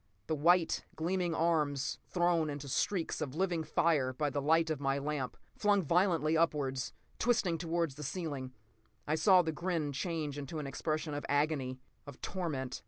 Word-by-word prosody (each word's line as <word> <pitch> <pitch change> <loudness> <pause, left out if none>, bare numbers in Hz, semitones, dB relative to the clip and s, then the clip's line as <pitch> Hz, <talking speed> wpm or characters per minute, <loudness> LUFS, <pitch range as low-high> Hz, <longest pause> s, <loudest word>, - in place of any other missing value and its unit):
The 155 - -1
white, 170 +2 +3
gleaming 175 +1 0
arms, 150 -5 +1
thrown 175 -3 +2
into 145 -1 -5
streaks 170 +6 -1
of 145 -2 -3
living 175 -2 0
fire 150 -4 +2
by 145 +2 -1
the 140 - -1
light 160 +3 +3
of 155 - -2
my 135 -1 +1
lamp, 140 -2 -3 0.2
flung 205 -2 +3
violently 165 -1 +2
upwards, 145 -5 +1 0.3
twisting 215 -9 +2
toward 165 -1 0
the 140 +3 -10
ceiling. 145 -4 -4 0.5
I 150 - 0
saw 185 +2 +6
the 160 - -1
grin 165 -2 -1
change 145 0 -3
to 150 +4 -6
an 150 - -3
expression 155 +3 -2
of 145 - -3
agony, 145 -3 0 0.3
of 145 - -10
torment. 150 -9 -3
155 Hz, 165 wpm, -33 LUFS, 145-170 Hz, 0.5 s, saw